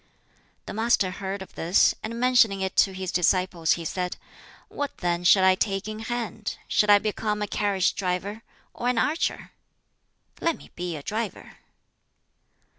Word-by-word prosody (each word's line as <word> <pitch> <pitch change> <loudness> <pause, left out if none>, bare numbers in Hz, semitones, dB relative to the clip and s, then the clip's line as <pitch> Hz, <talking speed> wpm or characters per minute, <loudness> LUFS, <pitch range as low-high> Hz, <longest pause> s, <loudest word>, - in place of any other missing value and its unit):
The - - -6
Master 220 -3 +2
heard 190 +1 -5
of - - -16
this, 170 +4 +3
and 230 +2 -5
mentioning 245 -6 +4
it 190 0 -2
to 195 - +5
his 185 -1 -4
disciples 180 -2 +2
he 170 - -5
said, 180 +2 -3 0.5
"What 285 -1 -5
then 175 -1 -1
shall 190 +2 +6
I 190 - +6
take 195 +1 -1
in 215 0 -5
hand? 225 -2 -4
Shall 210 - +2
I 205 - +9
become 210 0 -2
a - - -2
carriage 200 -3 +1
driver, 195 +3 -3 0.3
or 240 - -4
an 250 - 0
archer? 300 +8 -1 0.9
Let 335 -1 0
me - - -16
be 175 -1 -4
a 145 - -7
driver!" 220 +3 -5
200 Hz, 160 wpm, -25 LUFS, 185-220 Hz, 0.9 s, I